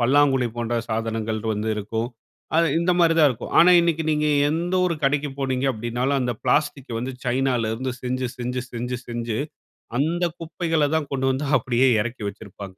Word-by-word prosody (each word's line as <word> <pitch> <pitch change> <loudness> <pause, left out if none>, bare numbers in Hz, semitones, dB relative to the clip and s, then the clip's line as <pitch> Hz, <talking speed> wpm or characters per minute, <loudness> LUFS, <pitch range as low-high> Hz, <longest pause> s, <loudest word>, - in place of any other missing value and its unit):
பல்லாங்குழி 135 0 +3
போன்ற 120 0 -2 0.2
சாதனங்கள் 110 -1 -2
வந்து 105 +1 -2
இருக்கும். 110 +3 -3 0.5
அது, 165 - +4
இந்த 180 +1 +2
மாரி 165 -1 +4
தான் 150 -2 +7
இருக்கும். 120 -1 -6
ஆனா 175 - +8
இன்னைக்கு 165 -1 0
நீங்க 150 0 +1 0.2
எந்த 170 +4 -1
ஒரு 170 - 0
கடைக்கு 145 +1 +1
போனீங்க 135 -1 -1
அப்படின்னாலும், 120 +4 -1
அந்த 125 -1 0
பிளாஸ்டிக் 140 -1 0
வந்து 125 +3 -4
சைனாலேருந்து 125 -1 0
செஞ்சு 125 0 -2
செஞ்சு 125 +1 -3
செஞ்சு 125 +1 -3
செஞ்சு 120 -2 -3 0.6
அந்த 165 +6 +1
குப்பைகள 165 -1 -1
தான் 155 -3 -1
கொண்டு 135 -1 -1
வந்து 135 +3 -2
அப்படியே 125 +2 +2
எறக்கி 120 0 -5
வச்சுருப்பாங்க. 100 -2 -9
130 Hz, 160 wpm, -23 LUFS, 120-145 Hz, 0.6 s, ஆனா